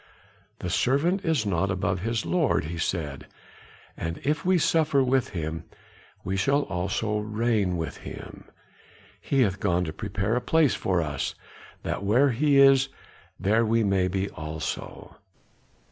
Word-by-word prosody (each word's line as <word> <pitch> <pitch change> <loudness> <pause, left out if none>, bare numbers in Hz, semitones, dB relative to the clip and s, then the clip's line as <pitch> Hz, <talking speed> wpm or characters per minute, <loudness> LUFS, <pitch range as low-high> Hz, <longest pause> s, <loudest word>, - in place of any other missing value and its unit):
"The 90 - -5
servant 155 - +1
is 160 - +1
not 95 -1 0
above 95 -1 -1
his 115 +3 -2
Lord," 170 -6 +1
he 85 +2 -5
said, 75 -6 -3 0.7
"and 85 0 -4
if 150 +3 0
we 185 0 +3
suffer 155 -4 +3
with 130 -1 +1
him, 80 -2 -4 0.6
we 95 - -2
shall 140 +9 +2
also 100 +4 -2
reign 105 -3 0
with 80 - -4
him; - - -10 0.8
he 135 -1 +1
hath 100 -5 +1
gone 90 -3 +1
to 80 -3 -4
prepare 105 +1 -2
a 125 - 0
place 155 +2 +3
for 90 -3 0
us, 75 -3 -3 0.5
that - - -3
where 125 +8 +4
he 140 +4 +2
is, 135 -1 +6 0.5
there 105 +5 +2
we 115 0 +2
may 95 -2 +2
be 95 +1 -1
also." 80 -1 -6
105 Hz, 145 wpm, -26 LUFS, 90-135 Hz, 0.8 s, is